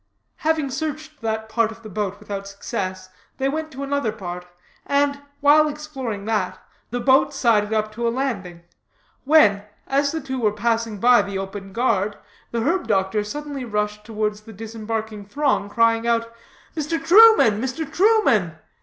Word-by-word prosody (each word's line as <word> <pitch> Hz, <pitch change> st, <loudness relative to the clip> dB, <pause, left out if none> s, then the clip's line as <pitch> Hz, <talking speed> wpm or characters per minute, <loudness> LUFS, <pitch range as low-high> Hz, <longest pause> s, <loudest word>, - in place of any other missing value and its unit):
Having 310 Hz, -3 st, 0 dB
searched 310 Hz, +1 st, -5 dB
that 220 Hz, -1 st, -2 dB
part 220 Hz, 0 st, +1 dB
of 225 Hz, +1 st, -13 dB
the -, -, -8 dB
boat 205 Hz, 0 st, -3 dB
without 200 Hz, -1 st, -6 dB
success, 185 Hz, -1 st, -5 dB, 0.3 s
they 270 Hz, -, 0 dB
went 315 Hz, +3 st, -3 dB
to 270 Hz, +1 st, -6 dB
another 280 Hz, -5 st, -1 dB
part, 180 Hz, -4 st, -7 dB, 0.4 s
and, 280 Hz, 0 st, +1 dB, 0.2 s
while 300 Hz, +2 st, +6 dB
exploring 270 Hz, -9 st, -5 dB
that, 215 Hz, -4 st, -1 dB, 0.3 s
the 245 Hz, -, -3 dB
boat 265 Hz, +3 st, +3 dB
sided 220 Hz, -5 st, +2 dB
up 215 Hz, -1 st, 0 dB
to 235 Hz, +2 st, -2 dB
a -, -, +3 dB
landing, 200 Hz, -10 st, -3 dB, 0.6 s
when, 260 Hz, -10 st, +5 dB, 0.2 s
as 280 Hz, +1 st, +1 dB
the 320 Hz, -, -2 dB
two 265 Hz, -2 st, -4 dB
were 210 Hz, -2 st, +2 dB
passing 225 Hz, -1 st, -1 dB
by 245 Hz, 0 st, +6 dB
the 200 Hz, -1 st, -4 dB
open 195 Hz, 0 st, -6 dB
guard, 210 Hz, -3 st, 0 dB, 0.3 s
the 235 Hz, -, -2 dB
herb 345 Hz, +10 st, 0 dB
doctor 195 Hz, +1 st, +1 dB
suddenly 285 Hz, +4 st, -5 dB
rushed 210 Hz, -2 st, -2 dB
towards 210 Hz, -1 st, -3 dB
the 220 Hz, +1 st, -12 dB
disembarking 220 Hz, 0 st, -5 dB
throng, 235 Hz, -2 st, 0 dB
crying 230 Hz, +1 st, +2 dB
out: 230 Hz, 0 st, 0 dB, 0.4 s
"Mr. 320 Hz, +1 st, -1 dB
Truman, 370 Hz, -, +7 dB
Mr. 265 Hz, +5 st, -3 dB
Truman! 305 Hz, -, +3 dB
230 Hz, 160 wpm, -22 LUFS, 210-280 Hz, 0.6 s, Truman